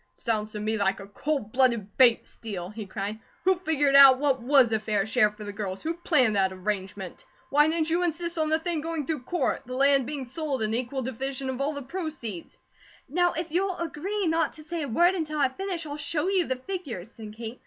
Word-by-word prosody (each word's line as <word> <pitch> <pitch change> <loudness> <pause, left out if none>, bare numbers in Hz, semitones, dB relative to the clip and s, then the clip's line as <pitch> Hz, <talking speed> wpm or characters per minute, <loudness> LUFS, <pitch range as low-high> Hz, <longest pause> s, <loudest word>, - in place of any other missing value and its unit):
"Sounds 215 -2 -2
to 210 - -4
me 215 +1 -1
like 195 -1 +1
a 195 - -8
cold 230 +2 -3
blooded 235 -6 +1
Bates 245 -3 +5
steal," 190 -6 -7
he 215 -1 -7
cried. 205 +2 -4 0.2
"Who 375 - +5
figured 310 -6 +1
out 275 -2 +10
what 270 -2 +1
WAS 255 -1 +5
a 220 - +2
fair 210 -2 0
share 220 0 +3
for 210 0 -11
the 205 -1 -6
girls; 195 -2 -5
who 325 - -1
planned 295 - +2
that 190 -1 +2
arrangement? 190 0 -4 0.3
Why 295 +2 +5
didn't 320 0 0
you 345 +2 +2
insist 340 0 -2
on 310 -1 +1
the 315 - +3
thing 325 -1 -2
going 325 -2 -3
through 310 -3 -2
court; 350 +4 0
the 255 - -5
land 275 -1 +4
belong 285 -2 -4
sold, 275 -1 -3
and 215 0 -1
equal 255 +3 -2
divisions 260 +2 -3
of 260 +1 -5
all 290 +2 0
the 285 -1 -5
proceeds?" 270 - -6 0.5
"Now 350 +5 +2
if 330 0 -4
you'll 370 +2 0
agree 360 +5 -3
not 325 -2 +1
to 310 - -10
say 330 +2 -4
a 290 - -3
word 345 +10 +4
until 310 -4 -3
I 280 -3 +3
finish, 355 +3 -4
I'll 290 -1 -5
show 300 +3 -1
you 380 -3 +2
the 260 - 0
figures," 255 - -6
said 215 -2 -9
Kate. 230 +1 -7
275 Hz, 225 wpm, -27 LUFS, 220-320 Hz, 0.5 s, out